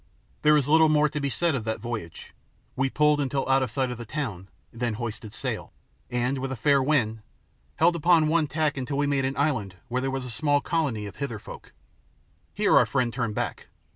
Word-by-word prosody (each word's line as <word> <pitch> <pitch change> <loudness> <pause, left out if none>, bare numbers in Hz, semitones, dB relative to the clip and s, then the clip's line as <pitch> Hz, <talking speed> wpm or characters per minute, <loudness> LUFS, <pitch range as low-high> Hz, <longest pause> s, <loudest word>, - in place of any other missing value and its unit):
There 150 0 +5
is 140 -3 0
little 160 +1 +5
more 150 0 +4
to 150 - -4
be 140 -1 -1
said 170 +4 +1
of 130 -5 -2
that 110 0 -2
voyage. 110 -8 -6 0.4
We 135 +1 +1
pulled 150 +1 +3
until 140 -1 -1
out 135 0 +4
of 130 - -1
sight 130 -3 -1
of 120 - -6
the - - -5
town, 105 -8 -5 0.2
then 115 -1 -2
hoisted 110 -2 -5
sail, - - -4 0.4
and, 125 +2 -1
with 135 0 -3
a - - -2
fair 140 +3 +3
wind, 120 -6 +1 0.5
held 170 +2 +3
upon 170 -1 +4
one 160 -1 +2
tack 155 -1 0
until 135 +2 -3
we 145 - +2
made 140 -2 +1
an 135 +1 -2
island 130 -11 0
where 125 +1 -1
there 135 - -1
was 135 -1 -3
a 125 - -5
small 145 +4 +2
colony 145 -10 -1
of 100 - -9
Hither 140 -6 -3
folk. - - -11 0.8
Here - - +2
our - - +6
friend 120 -2 0
turned 120 -5 -2
back. - - -3
135 Hz, 215 wpm, -26 LUFS, 120-150 Hz, 0.8 s, our